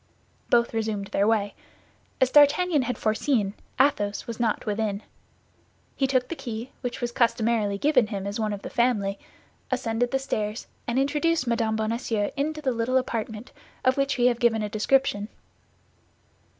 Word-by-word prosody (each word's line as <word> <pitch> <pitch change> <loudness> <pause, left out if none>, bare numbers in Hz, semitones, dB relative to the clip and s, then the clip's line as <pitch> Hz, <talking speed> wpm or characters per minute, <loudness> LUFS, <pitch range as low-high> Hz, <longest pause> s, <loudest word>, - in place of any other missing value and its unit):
Both 235 -1 +3
resumed 215 -3 -2
their 200 0 +1
way. 205 -3 +1 0.7
As 260 -1 +3
D'Artagnan 295 +2 +5
had 250 0 -2
foreseen, 215 -1 0 0.3
Athos 210 -7 +2
was 235 -1 -6
not 230 -2 0
within. 210 -1 -2 0.9
He 270 - +1
took 255 -2 +1
the 335 - -5
key, 235 -3 -6
which 245 -1 -4
was 240 0 -1
customarily 230 -3 +1
given 255 -2 +3
him 200 -3 -4
as 200 +2 -3
one 215 -1 0
of 200 -1 -5
the - - -6
family, 210 -5 +1 0.5
ascended 245 -2 0
the 270 - +1
stairs, 215 -5 -3 0.2
and 240 +1 -1
introduced 295 +2 +1
Mme. 230 -2 0
Bonacieux 220 -1 -1
into 305 +2 -2
the 265 - +1
little 235 +2 +1
apartment 225 -2 -3 0.3
of 255 0 +4
which 275 0 0
we 245 - +3
have 240 -1 +3
given 225 -3 +2
a 210 - -2
description. 215 -1 +1
235 Hz, 160 wpm, -26 LUFS, 215-260 Hz, 0.9 s, D'Artagnan